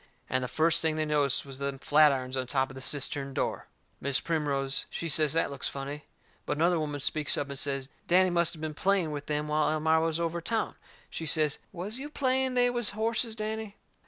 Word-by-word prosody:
And 130 +1 +1
the - - -2
first 160 +4 +3
thing 160 -1 +1
they 155 0 0
noticed 145 -3 +2
was 135 -1 -9
them 140 -1 -2
flatirons 135 -3 +3
on 130 -1 -2
top 135 0 0
of - - -11
the 130 - -8
cistern 140 0 -1
door. - - -2 0.3
Mis' 140 -1 +1
Primrose, 140 -4 -1
she 170 - -3
says 155 -1 +3
that 165 -3 +1
looks 140 -1 -1
funny. 140 +2 -6 0.4
But - - -1
another 170 +2 +3
woman 145 -2 -3
speaks 150 +2 0
up 145 -1 -2
and 140 - -3
says 135 -2 +1 0.2
Danny 185 +1 +4
must 170 -1 +2
of 155 - -12
been 155 -1 -3
playing 185 0 +1
with 145 -1 -5
them 150 0 -1
while 150 0 +2
Elmira 160 +1 +2
was 165 0 0
over 170 0 -1
town. 225 +6 -1 0.4
She 160 - -4
says, 155 -1 +2
"Was 200 +7 -5
you 290 +2 -6
playing 265 -3 0
they 245 0 +4
was 240 -3 0
horses, 225 +1 0
Danny?" 215 -1 -4
155 Hz, 215 wpm, -29 LUFS, 140-175 Hz, 0.4 s, Danny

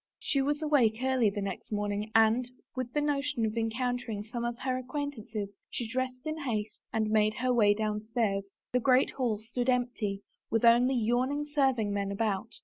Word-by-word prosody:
She 275 - 0
was 290 +3 0
awake 255 -8 +3
early 260 -4 +3
the 200 0 -3
next 200 - -5
morning 205 0 -1
and, 225 +3 +4 0.3
with 255 -2 -3
the 295 - 0
notion 290 -4 0
of 215 0 -2
encountering 230 -1 -2
some 235 +2 -5
of 235 0 -2
her 260 -1 0
acquaintances, 250 -6 -4 0.2
she 240 - -3
dressed 255 +2 -3
in 310 0 -3
haste 220 -7 -3
and 220 -1 0
made 215 0 +3
her 250 +2 +1
way 205 -4 +5
downstairs. 215 -1 -1 0.3
The 250 - +4
great 255 +1 +4
hall 245 -5 0
stood 235 +4 -3
empty, 240 -5 0 0.3
with 225 +1 +2
only 245 +3 +5
yawning 250 +5 +1
serving 265 -8 +1
men 200 -1 -1
about. 205 +1 -1
235 Hz, 175 wpm, -30 LUFS, 215-255 Hz, 0.3 s, way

